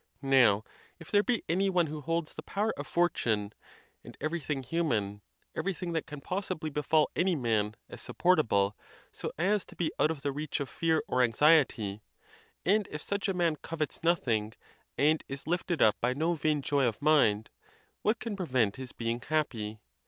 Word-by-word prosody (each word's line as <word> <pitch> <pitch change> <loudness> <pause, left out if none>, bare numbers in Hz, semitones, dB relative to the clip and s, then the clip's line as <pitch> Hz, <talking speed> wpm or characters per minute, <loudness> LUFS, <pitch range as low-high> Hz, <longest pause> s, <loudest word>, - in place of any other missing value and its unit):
Now, 120 -7 +5 0.4
if 165 - -12
there 205 - +5
be 240 +2 0
any 190 +4 +2
one 180 -3 +3
who 155 0 -6
holds 165 +1 -2
the - - -7
power 205 +7 -1
of 145 - -6
fortune, 110 -12 +1 0.5
and - - -12
everything 150 -3 -2
human, 115 -10 -1 0.3
everything 185 -2 -2
that 160 - -2
can 150 -3 -8
possibly 180 -2 -3
befall 150 +1 +2
any 180 +2 +2
man, 110 -5 0
as - - -10
supportable, 110 - +2 0.4
so.as 195 +5 -1
to - - -15
be 165 -3 -1
out 155 - +4
of 155 -4 -4
the 140 - 0
reach 150 +2 -3
of 140 - -3
fear 160 -2 +1
or 125 - +1
anxiety, 120 -5 +3 0.6
and 205 +3 +3
if 150 0 -6
such 200 +1 -2
a 190 - 0
man 170 -3 +1
covets 155 0 -4
nothing, 115 -11 +1 0.4
and 155 +2 +3
is 135 0 -6
lifted 175 0 0
up 110 - +3
by 125 +2 +1
no 160 +4 +1
vain 150 -2 0
joy 140 -3 +2
of 110 - -2
mind, 120 -8 +3 0.5
what 215 +3 +2
can 225 -3 -4
prevent 130 - 0
his 130 -1 -8
being 115 +1 -2
happy? 115 -8 -2
150 Hz, 175 wpm, -30 LUFS, 120-170 Hz, 0.6 s, Now